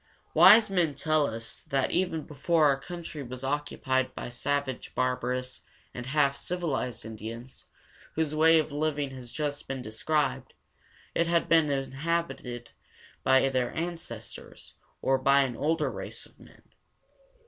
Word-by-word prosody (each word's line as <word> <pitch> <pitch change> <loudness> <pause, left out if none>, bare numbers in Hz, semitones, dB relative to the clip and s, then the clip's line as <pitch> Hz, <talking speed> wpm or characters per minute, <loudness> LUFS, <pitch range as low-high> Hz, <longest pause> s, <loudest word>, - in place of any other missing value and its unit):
Wise 205 +7 +8
men 175 -7 +1
tell 155 +1 +2
us 115 -1 -3
that 135 -1 -1
even 175 -3 0
before 155 +2 +1
our 140 -2 +3
country 165 0 -7
was 130 0 -7
occupied 135 -2 -1
by - - -5
the - - -12
savage, 135 +1 -2
barbarous, 125 0 -1 0.3
and 125 0 -6
half 140 0 +2
civilized 145 -10 -2
Indians, 115 +3 -8 0.5
whose 155 -2 0
way 160 +1 +6
of 155 -1 0
living 145 -1 -1
has 125 -2 -8
just 145 -2 -3
been 135 -1 -4
described, 135 +3 -1 0.6
it 170 - +1
had 170 0 +2
been 160 -3 +4
inhabited 135 -3 -2 0.5
by 130 +1 +5
their 130 -2 0
ancestors 170 0 -6 0.3
or 135 0 +3
by 140 +1 +5
an 125 -3 -3
older 155 +3 0
race - - -6
of - - -22
men. - - -18
140 Hz, 140 wpm, -28 LUFS, 130-160 Hz, 0.6 s, Wise